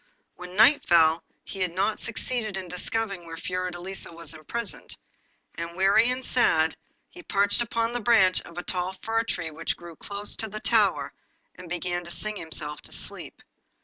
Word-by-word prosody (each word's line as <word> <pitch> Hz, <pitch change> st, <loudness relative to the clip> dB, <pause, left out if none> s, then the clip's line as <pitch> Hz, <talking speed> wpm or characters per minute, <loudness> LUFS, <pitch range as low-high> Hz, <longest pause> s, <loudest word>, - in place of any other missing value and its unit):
When 180 Hz, 0 st, -9 dB
night 230 Hz, +8 st, +7 dB
fell 165 Hz, -1 st, +5 dB, 0.2 s
he 195 Hz, -, -8 dB
had 180 Hz, -2 st, -1 dB
not 200 Hz, +3 st, +1 dB
succeeded 225 Hz, -2 st, -2 dB
in 185 Hz, -1 st, -5 dB
discovering 190 Hz, 0 st, -2 dB
where 165 Hz, 0 st, -7 dB
Fiordelisa 180 Hz, +1 st, -4 dB
was 165 Hz, -2 st, -6 dB
imprisoned, 190 Hz, +8 st, -5 dB, 0.6 s
and, 170 Hz, +1 st, -6 dB
weary 195 Hz, +5 st, +5 dB
and 255 Hz, +1 st, -2 dB
sad, -, -, +4 dB, 0.3 s
he 355 Hz, -, -12 dB
perched 200 Hz, -, +2 dB
upon 230 Hz, 0 st, 0 dB
a -, -, +1 dB
branch 205 Hz, -5 st, +5 dB
of 170 Hz, -, -13 dB
a 175 Hz, -, -3 dB
tall 180 Hz, +1 st, -1 dB
fir 225 Hz, 0 st, +1 dB
tree 175 Hz, -8 st, -3 dB
which 160 Hz, +2 st, -2 dB
grew 170 Hz, -1 st, -10 dB
close 205 Hz, +5 st, -4 dB
to 220 Hz, -, -2 dB
the 215 Hz, +1 st, -5 dB
tower, -, -, +2 dB, 0.4 s
and 180 Hz, -, -11 dB
began 175 Hz, 0 st, -2 dB
to -, -, -8 dB
sing 210 Hz, +6 st, -2 dB
himself 150 Hz, -3 st, -5 dB
to -, -, -11 dB
sleep. -, -, -5 dB
185 Hz, 175 wpm, -27 LUFS, 170-220 Hz, 0.6 s, night